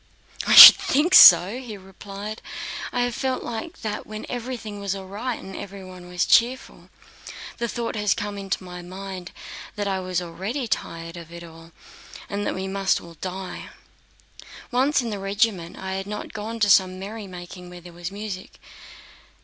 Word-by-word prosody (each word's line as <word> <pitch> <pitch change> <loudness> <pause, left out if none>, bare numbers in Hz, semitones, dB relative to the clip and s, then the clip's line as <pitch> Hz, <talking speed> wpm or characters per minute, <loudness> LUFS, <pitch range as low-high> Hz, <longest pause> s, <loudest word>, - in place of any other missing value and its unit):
"I - - +4
should - - +13
think 305 +7 0
so!" 200 - +8
he 235 -5 -9
replied. 200 +3 -9 0.5
"I 245 - -1
have 245 0 -1
felt 260 +1 -3
like 240 +9 -7
that 210 -1 -5
when 215 0 -8
everything 235 -4 -6
was 200 -1 -3
all 195 -1 -8
right 220 +6 -5
and 190 0 -10
everyone 185 -2 -10
was 180 0 -1
cheerful. 250 +3 +1 0.7
The 235 - -1
thought 235 0 -4
has 210 -2 +1
come 205 -2 -5
into 195 -1 -4
my 180 -1 -9
mind 185 0 -8 0.4
that 205 -1 -3
I 190 -1 -1
was 185 -1 -2
already 195 +10 -5
tired 165 -4 -5
of 170 -1 -11
it 170 0 -10
all, 165 0 -14 0.6
and 205 0 -3
that - - -2
we 190 +1 -4
must 195 0 0
all 170 - -13
die. 185 0 -7 1.0
Once 260 +2 +1
in 230 - -4
the 205 - -5
regiment 195 -3 -1
I 190 0 -5
had 195 +1 -5
not 210 0 -7
gone 220 +2 -6
to 205 - +3
some 185 -1 +4
merrymaking 185 -3 -9
where 180 0 -11
there 175 0 -13
was 175 0 -6
music... 200 -2 -8
195 Hz, 175 wpm, -23 LUFS, 185-220 Hz, 1.0 s, should